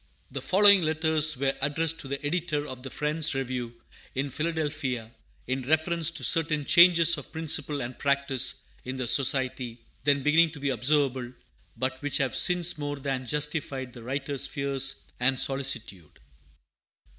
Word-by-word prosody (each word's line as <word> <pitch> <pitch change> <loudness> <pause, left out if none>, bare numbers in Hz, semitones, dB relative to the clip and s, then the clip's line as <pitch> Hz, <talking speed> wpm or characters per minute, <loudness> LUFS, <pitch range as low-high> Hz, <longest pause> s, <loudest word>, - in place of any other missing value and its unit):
The - - -5
following 200 0 +5
letters 155 -2 +3
were 135 +1 0
addressed 160 +3 +1
to - - -4
the 140 +1 -5
Editor 150 -2 -1
of 130 -1 -8
the 135 - -7
Friends' 150 +2 -1
Review 125 -3 -4 0.4
in 135 +1 -2
Philadelphia, 150 -7 -3 0.3
in 130 +1 -2
reference 160 +4 +1
to 170 - -5
certain 155 -3 +1
changes 170 -1 +6
of 140 - -13
principle 150 -3 0
and 120 +1 -7
practice 140 -2 0 0.2
in 130 +1 -6
the 130 - -2
Society 130 -2 +1 0.3
then 140 -1 +2
beginning 160 +2 +4
to 145 - -10
be 140 0 -1
observable, 130 -2 0 0.5
but 130 0 -3
which 145 -1 0
have 135 -2 -1
since 175 -3 +2
more 145 0 -3
than 135 -2 -4
justified 145 -3 -3
the 120 - -11
writer's 135 +3 -3
fears 135 -1 -1 0.2
and 125 +1 +2
solicitude. 130 - -2
140 Hz, 150 wpm, -27 LUFS, 130-155 Hz, 0.5 s, changes